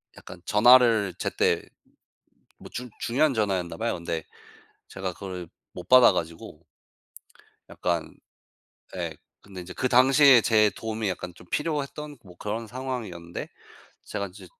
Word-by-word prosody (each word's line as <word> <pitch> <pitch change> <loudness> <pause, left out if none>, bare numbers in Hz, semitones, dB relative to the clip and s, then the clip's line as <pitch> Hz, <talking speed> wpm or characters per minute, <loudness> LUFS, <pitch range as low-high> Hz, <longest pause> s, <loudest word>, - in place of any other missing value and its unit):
약간 90 - -12
전화를 115 -3 +5
제때 - - 0 1.0
뭐 - - -12
중 125 0 -6
중요한 140 +3 +1
전화였나 95 -5 -1
봐요. 115 +1 -1
근데 85 -2 -4 0.6
제가 95 -1 -5
그걸 90 -2 -7 0.2
못 90 - -10
받아 130 -5 +8
가지고 85 -2 -5 1.1
약간 85 -2 -3 0.8
예 - - -4 0.2
근데 95 -2 -10
인제 90 +1 -9
그 130 - -1
당시에 130 +1 +6
제 105 -2 +3
도움이 110 -2 -3
약간 90 -1 -5
좀 85 - -16
필요했던 150 -1 -3
뭐 90 -1 -15
그런 110 +2 -4
상황이었는데 110 -9 -6 0.6
제가 100 -1 -4
인제 95 +1 -13
105 Hz, 265 characters per minute, -26 LUFS, 90-125 Hz, 1.1 s, 받아